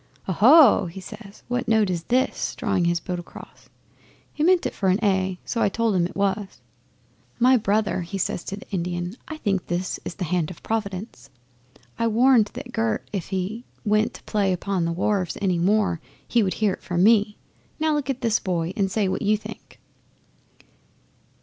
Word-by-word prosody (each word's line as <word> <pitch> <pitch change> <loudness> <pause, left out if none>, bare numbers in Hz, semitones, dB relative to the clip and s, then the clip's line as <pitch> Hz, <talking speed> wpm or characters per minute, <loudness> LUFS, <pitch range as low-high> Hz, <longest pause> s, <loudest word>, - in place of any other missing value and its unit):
'"Oho!" 230 - +6
he 170 +3 -8
says. 200 +2 -11
"What 245 0 -2
note 220 -4 +3
is 170 -2 -3
this?" 255 +2 0
drawing 175 - 0
his 170 0 +1
bow 180 - -5
across. 175 - -13 0.6
'He - - -6
meant 360 +1 +4
it - - -2
for 195 - 0
A, 190 -2 +1
so 230 - -2
I - - +3
told 225 +1 0
him 175 -1 +2
it 180 - -14
was. 200 -2 -1 0.8
'"My 255 +2 +5
brother," 210 -3 +1
he 175 +3 -5
says 175 - -2
to 195 - -4
the - - -12
Indian. 175 0 -3
"I 315 - -6
think 195 -9 -1
this 175 +1 -2
is - - -6
the 195 - -4
hand 170 -2 0
of 180 - -11
Providence! 200 - -4 0.7
I 230 - +2
warned 230 -1 +4
that 245 - -7
Gert 225 -2 -1
if 190 -5 -3
he 195 +5 -3 0.2
went 215 +1 +2
to - - -12
play 200 -3 0
upon 185 -1 -1
the 170 - -1
wharves 185 +1 -1
any 185 -4 +1
more 195 -2 +1 0.3
he 240 - +3
would 190 -3 0
hear 210 -3 0
from 175 0 0
me. 210 -1 +4 0.4
Now 315 0 +2
look 290 -2 -2
at 265 -2 -2
this 230 -2 +2
boy 175 -2 -2
and 195 -2 +1
say 200 0 0
what 185 - -2
you 210 +1 +2
think." 215 - -11
200 Hz, 185 wpm, -24 LUFS, 180-225 Hz, 0.8 s, Oho